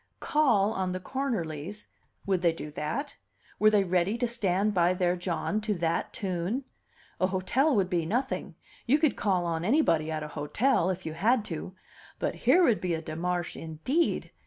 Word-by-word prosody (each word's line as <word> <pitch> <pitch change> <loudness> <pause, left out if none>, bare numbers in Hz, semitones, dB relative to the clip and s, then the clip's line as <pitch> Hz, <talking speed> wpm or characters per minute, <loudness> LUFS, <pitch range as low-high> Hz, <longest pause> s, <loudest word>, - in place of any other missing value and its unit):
Call 225 -9 +2
on 185 -2 -1
the 185 - -3
Cornerlys! 200 - -4 0.4
Would 190 -3 +1
they 170 -2 +3
do 150 -2 -7
that? 155 - -4 0.4
Were 215 - +6
they 210 -2 +3
ready 185 +4 +1
to 245 - 0
stand 210 -3 +1
by 180 -1 +3
their 180 -1 +1
John 180 +4 -2
to 210 -1 -1
that 170 -1 -1
tune? 190 +7 -2 0.6
A 185 - +3
hotel 235 +10 +1
would 195 -3 +2
be 175 -3 -1
nothing; 245 +9 -2 0.3
you 275 +5 +5
could 310 -2 +2
call 185 -4 +1
on 165 -1 -1
anybody 180 - +2
at 155 -1 -3
a 150 - -6
hotel, 175 - +1
if 185 -1 -3
you 160 - -4
had 215 +7 +2
to; 175 +4 -6 0.4
but - - -1
here 365 - +4
would 235 -10 +3
be 180 -2 0
a 160 - -4
demarche 170 +2 -2
indeed! 165 - -1
185 Hz, 180 wpm, -28 LUFS, 170-225 Hz, 0.6 s, Were